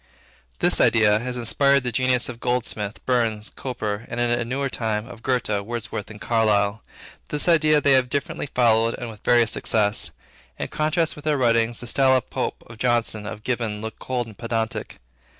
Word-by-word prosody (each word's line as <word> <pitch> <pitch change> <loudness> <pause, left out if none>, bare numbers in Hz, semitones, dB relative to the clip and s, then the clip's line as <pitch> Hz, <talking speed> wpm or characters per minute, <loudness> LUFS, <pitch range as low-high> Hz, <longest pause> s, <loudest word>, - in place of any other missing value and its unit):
This - - +2
idea 110 -2 +4
has 125 +2 -4
inspired 140 +3 +3
the 125 - -2
genius 125 +1 +1
of 120 -2 -7
Goldsmith, 115 -4 -2
Burns, 115 -4 0
Cowper, 110 -4 -4
and, - - -4
in 120 0 +1
a 120 0 +1
newer 135 +4 -2
time, 110 -4 -2
of 120 -3 -11
Goethe, 125 -1 0 0.2
Wordsworth, 105 -2 -5
and 105 -1 -10
Carlyle. 110 -2 +1 0.5
This 150 +3 0
idea 155 -3 +5
they 140 - +2
have 130 -2 +4
differently 145 +2 -2
followed 115 -3 +2
and 120 -3 -6
with 105 - -15
various 120 -2 +4
success. 105 -1 +1 0.5
In - - -4
contrast 155 +2 0
with 150 - -12
their 150 -2 +2
writing, 115 -2 +2
the 120 - -8
style 130 +2 +3
of 125 - -6
Pope, - - -3
of 115 -1 -13
Johnson, 115 -4 0
of 105 - -7
Gibbon, 115 -4 -2
looks 110 +1 -6
cold 125 -2 -2
and 110 -2 -12
pedantic. 115 0 -3
120 Hz, 185 wpm, -23 LUFS, 110-130 Hz, 0.5 s, idea